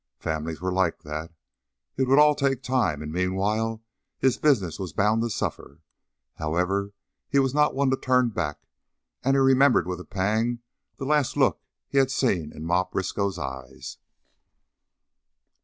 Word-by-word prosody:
Families 80 +1 -4
are 95 - 0
like 90 -2 0
that. 75 +2 -6 0.6
It 130 0 0
would 135 +2 +4
all 150 0 +7
take 135 -2 -1
time, 115 - 0
and 75 - -6
meanwhile 105 +6 -1 0.3
his 130 -2 +1
business 100 - +2
was 90 -6 -5
bound 105 +5 +2
to 120 - -1
suffer. - - -5 0.5
However, 90 +6 -1 0.4
he 140 - +1
was 135 -1 +2
not 150 -1 +2
one 135 -1 +2
to 130 - +1
turn 125 -2 +2
back, 85 -8 -4 0.6
and 135 +2 +2
he - - +3
remembered 135 0 +4
with 90 -1 -3
a - - -7
pang 110 +6 -1 0.4
the 135 - -5
last 145 -2 +1
look - - +2 0.3
he 140 - +2
had 135 -1 +3
seen 95 - 0
in 80 - -8
Ma 90 +2 +2
Briskow's 95 +1 -2
eyes. 65 -3 -7
105 Hz, 155 wpm, -25 LUFS, 90-130 Hz, 0.6 s, all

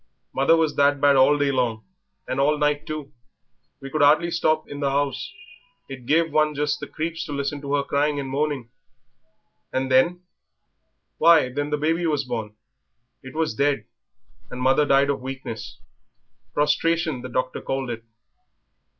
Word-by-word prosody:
Mother 140 +5 +4
was 160 -2 0
that 145 0 +3
bad 140 0 +5
all 135 +2 +5
the 145 - +1
day 140 - +1
long 120 -4 -1 0.4
and 130 - -2
all 150 +2 +3
night 150 0 0
too 150 -2 -6 0.7
we 135 0 -9
could 155 - -1
'ardly 155 +4 +4
stop 155 -2 +1
in 145 - -7
the 140 - 0
'ouse; 145 - -1 0.6
it 125 -3 -10
gave 160 0 +2
one 155 -1 +2
just 145 +1 -1
the 145 - -6
creeps 160 +1 -4
to 155 - -8
listen 140 0 -3
to 140 0 -1
her 140 - +1
crying 145 +1 0
and 135 - -4
moaning." 135 -3 -2 1.0
"And 130 0 -2
then?" 170 +8 +3 1.0
"Why, 165 -6 +6
then 145 +3 -3
the 150 - 0
baby 165 +3 0
was 150 -3 0
born. 110 -4 -5 0.7
It 130 +2 -11
was 160 -6 0
dead, 140 +3 0 0.6
and 125 - -7
mother 135 +3 +3
died 140 +1 +4
of 140 - -4
weakness; 130 -3 -7 0.7
prostration 155 -1 +1
the 130 - -7
doctor 130 +1 -2
called 135 -2 -3
it." 115 -1 -6
145 Hz, 165 wpm, -23 LUFS, 135-150 Hz, 1.0 s, Why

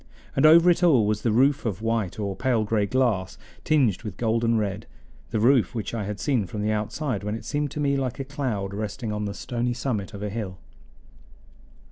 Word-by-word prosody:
And 145 +3 +5
over 165 +2 +7
it 175 - 0
all 145 -11 +5
was 105 0 0
the 115 - +1
roof 135 +6 +3
of 110 -3 -3
white 115 -5 -1
or 100 -2 -3
pale 120 -2 +1
gray 105 -1 0
glass 115 -6 0 0.3
tinged 130 - +2
with 105 -5 -7
golden 115 0 +1
red 105 -1 -2 0.4
the 110 - -1
roof 125 +1 +3
which 110 -1 -4
I 110 -3 -2
had 105 0 -5
seen 120 -5 0
from 105 +3 -4
the 105 - +1
outside 110 +2 -2
when 105 +1 -2
it 110 -1 -8
seemed 145 0 -1
to 150 - -6
me 140 -1 +1
like 130 -1 -2
a 135 - -3
cloud 125 -9 -3
resting 110 +2 -4
on 105 0 -2
the 100 -1 -4
stony 120 +1 -2
summit 115 -5 -3
of 100 - -6
a 105 - -3
hill. 100 -4 -5
115 Hz, 210 wpm, -25 LUFS, 105-130 Hz, 0.4 s, over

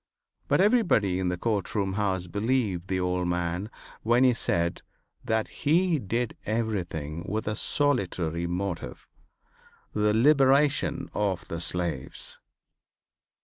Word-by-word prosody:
But - - +3
everybody 175 - +3
in 95 - 0
the 90 - -2
court 105 0 -1
house 95 -2 0
believed 105 -2 -1
the 95 -1 -1
old 90 0 0
man 90 +3 -2 0.3
when 120 +3 +3
he 130 -1 +5
said 85 -6 -1 0.4
that 110 -1 0
he 165 +2 +1
did 115 +2 -2
everything 90 -8 -2
with 110 +2 -2
a 105 - -1
solitary 90 - 0
motive, 90 -6 -4 0.9
the 105 0 +2
liberation 140 +2 +3
of 95 -5 -1
the 85 - -4
slaves. 85 -6 -3
100 Hz, 115 wpm, -27 LUFS, 90-120 Hz, 0.9 s, he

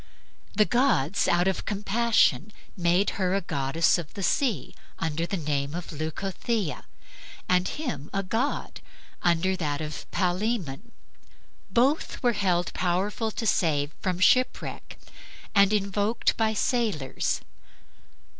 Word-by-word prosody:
The 215 - +5
gods, 205 - +2
out 175 +1 +3
of 190 - -1
compassion, 210 - +2 0.2
made 175 +2 +2
her 185 0 +2
a 195 - +1
goddess 160 +1 +1
of 160 -4 -8
the 195 - -4
sea, 225 - 0 0.2
under 165 +1 -2
the 195 - -2
name 145 -2 -2
of 175 0 -6
Leucothea, 180 +4 -3 0.6
and 180 0 +3
him 170 - -4
a 195 - -1
god, 230 +9 -2 0.4
under 175 +2 +2
that 150 -5 -2
of 155 -1 -6
Palaemon. 190 - -1 0.8
Both 270 +4 +1
were 245 -1 +4
held 185 -4 0
powerful 190 +5 0
to 225 - -4
save 150 -8 +1
from 185 -2 -1
shipwreck 255 +7 +1 0.6
and 200 -1 +6
were 215 - +4
invoked 205 +3 0
by 220 -1 +1
sailors. 210 - 0
185 Hz, 125 wpm, -27 LUFS, 165-215 Hz, 0.8 s, and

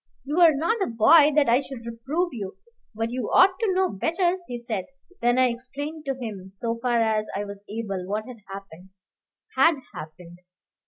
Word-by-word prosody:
"You 295 +5 -1
are 330 -4 +7
not 365 +10 0
a - - +1
boy, 290 +7 +6
that 295 -2 +4
I 235 +2 +5
should 265 -4 -8
reprove 270 +10 -2
you; 200 -5 -6 0.4
but 225 +1 -2
you 245 -3 -3
ought 375 +1 +6
to 445 -4 +1
know 375 0 +2
better," 345 - 0
he 245 - -4
said. 230 -5 -4 0.4
Then 240 +1 +3
I 255 -1 +5
explained 285 +6 -6
to 270 -1 -1
him, 205 -6 -6
so 230 +4 -4
far 240 -1 +2
as 220 -1 +1
I 205 +1 -2
was 200 0 -8
able, 200 -4 -4
what 210 +2 -2
had 250 -3 -10
happened. 190 -2 -10 0.7
Had 330 -1 +5 0.2
happened? 170 +3 -10
235 Hz, 190 wpm, -25 LUFS, 210-300 Hz, 0.7 s, are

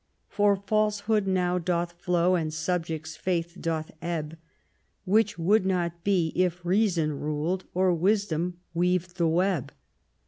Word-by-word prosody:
For 205 -1 +3
falsehood 210 +1 0
now 180 -1 +1
doth 175 0 -1
flow, 175 +1 +1
and 160 -3 0
subject's 160 -1 -3
faith 170 -1 -2
doth 160 -2 -2
ebb; 160 -2 -3 0.7
Which 210 +1 +2
would 185 +5 +3
not 175 -3 -1
be 180 -5 +1
if 180 -1 0
Reason 175 -5 +2
ruled, 155 +5 -2
or 185 0 +3
Wisdom 180 -1 0 0.2
weaved 180 +1 0
the 170 -2 +2
web. 170 -4 +1
180 Hz, 130 wpm, -27 LUFS, 165-190 Hz, 0.7 s, For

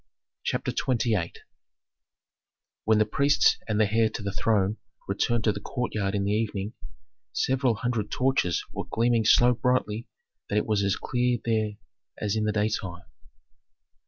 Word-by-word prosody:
CHAPTER - - -1
XXVIII 110 -8 0 1.5
When 110 0 +4
the 110 - +4
priests 140 +7 +3
and 110 -1 0
the 110 - +4
heir 115 -1 +4
to 105 - -6
the 100 - -2
throne 105 0 +1 0.3
returned 110 +3 0
to 110 - +3
the 100 - -5
courtyard 105 -3 -2
in 100 - 0
the 100 - 0
evening, 105 -1 -1 0.6
several 130 -2 +1
hundred 115 -2 -2
torches 125 -9 +1
were - - -4
gleaming 115 -1 +2
so 120 +3 +6
brightly 120 -3 0 0.4
that 105 - 0
it 105 - +1
was 105 -2 +1
as 100 0 +2
clear 125 -1 0
there 110 -2 +1 0.4
as 105 0 -1
in 110 -1 0
the 105 - +1
daytime. 105 -4 -2
110 Hz, 150 wpm, -27 LUFS, 105-120 Hz, 1.5 s, so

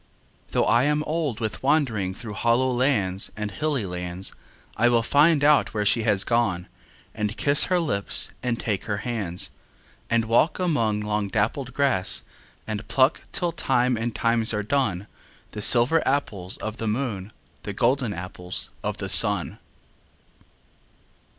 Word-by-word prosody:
Though - - +1
I 120 +3 +3
am 150 +1 +1
old 155 -7 -2
with 110 -2 -3
wandering 120 -10 +1
Through 115 -1 -8
hollow 120 +5 +1
lands 120 -8 0
and 105 -1 -3
hilly 145 -1 -1
lands, 90 +1 -4 0.4
I 120 +2 +3
will 120 -1 +2
find 145 +4 +4
out 145 -5 +3
where 105 -1 0
she 115 +3 +3
has 105 -3 +2
gone, 105 -7 0 0.5
And 105 0 -3
kiss 140 0 +4
her 180 -1 +1
lips 130 -12 0
and 120 -2 -2
take 105 -4 -2
her 100 -1 -3
hands; 100 -8 -2 0.6
And 115 -1 +2
walk 115 +8 +2
among 115 - 0
long 105 -1 -1
dappled 120 +6 -2
grass, 130 -10 +1 0.4
And 110 0 -5
pluck 135 +3 +2
till 175 -2 -1
time 130 -5 +1
and 115 +1 -3
times 115 -1 +2
are 105 - -1
done 105 -5 -1 0.5
The 105 - -6
silver 125 +9 +5
apples 105 -10 -2
of 110 +1 -6
the 115 - -4
moon, 110 -4 -3 0.3
The 105 - -5
golden 125 +1 +1
apples 90 0 -4
of - - -3
the - - -4
sun. - - +2
115 Hz, 150 wpm, -24 LUFS, 105-135 Hz, 0.6 s, silver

